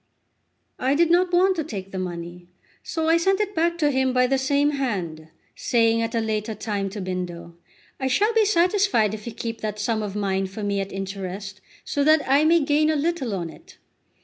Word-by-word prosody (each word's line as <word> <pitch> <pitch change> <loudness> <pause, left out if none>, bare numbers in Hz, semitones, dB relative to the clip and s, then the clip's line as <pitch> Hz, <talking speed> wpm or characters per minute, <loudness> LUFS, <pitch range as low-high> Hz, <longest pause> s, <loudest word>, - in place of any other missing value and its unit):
I 265 +2 +1
did 335 +2 +3
not 355 +1 +3
want 370 +2 +4
to 320 - 0
take 195 -9 -7
the 190 - -4
money, 175 -1 -6 0.3
so 320 -1 -3
I 330 +1 +5
sent 385 +3 +2
it 415 -1 -1
back 340 0 +1
to 295 -3 +2
him 260 -1 +1
by 250 0 +4
the 265 +1 +1
same 285 +2 +2
hand, 185 - -3 0.3
saying 230 -1 +2
at 230 0 -2
a - - +2
later 220 0 -2
time 200 -3 -3
to 205 +2 -7
Bindo: 175 -2 -5 0.5
"I 265 - -1
shall 415 - +2
be 445 -1 +4
satisfied 360 - +2
if 215 +1 -7
you - - -3
keep 230 -1 -5
that 210 -1 -3
sum 220 +1 -1
of 205 -2 -5
mine 195 -2 -1
for 200 +3 -7
me 200 -1 0
at 195 - -6
interest, 195 0 -6 0.2
so 285 - 0
that 310 -1 +4
I 280 +3 +4
may 330 +1 +5
gain 300 +1 +2
a 315 - +2
little 290 -7 -1
on 170 -3 -4
it." - - -17
230 Hz, 210 wpm, -24 LUFS, 195-315 Hz, 0.5 s, I